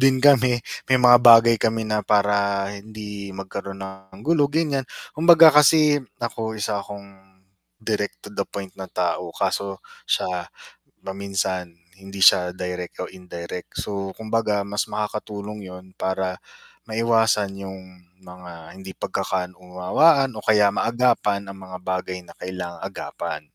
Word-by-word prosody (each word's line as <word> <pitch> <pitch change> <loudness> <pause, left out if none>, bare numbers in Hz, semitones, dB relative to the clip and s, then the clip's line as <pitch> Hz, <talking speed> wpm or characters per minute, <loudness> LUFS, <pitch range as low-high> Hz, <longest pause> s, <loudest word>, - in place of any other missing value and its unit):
din 135 0 +5
kami. 130 -3 +4 0.2
May 130 - +5
mga 125 -1 +7
bagay 115 -1 +8
kami 115 0 0
na 110 0 0
para 100 -1 +1
hindi 105 -1 -8
magkaroon 95 0 -6
ng 95 0 -12
gulo 150 -3 +3
ganyan, 145 -3 0 0.3
kumbaga 165 0 +7
kasi 150 0 +5 0.2
ako 110 -2 -4
isa 105 -1 -2
akong 100 -1 -12 0.4
direct-to-the 105 - -4
point 100 -2 -7
na 95 - -6
tao 90 0 -2
kaso 100 0 -1 0.3
siya 90 -5 -1 0.5
paminsan 95 -2 -3 0.2
hindi 95 0 -10
siya 90 0 +6
direct 90 -1 -5
o - - -6
indirect. 90 -1 -8
So, 100 -2 -4
kumbaga 110 -2 -1
mas 105 +2 -2
makakatulong 105 -1 -5
yun 90 0 -12
para 95 -1 -2 0.5
maiwasan 110 -3 +1
yung 95 -2 -10 0.2
mga 90 -2 -12
hindi 95 0 -9
pagkaka-unawaan, 90 - +1
o - - -6
kaya 105 -2 +4
maagapan 115 -5 +1
ang 95 - -12
mga 90 - -6
bagay 95 0 -3
na - - -15
kailangang 90 -1 -6
agapan. 75 - -5
100 Hz, 125 wpm, -23 LUFS, 95-115 Hz, 0.5 s, bagay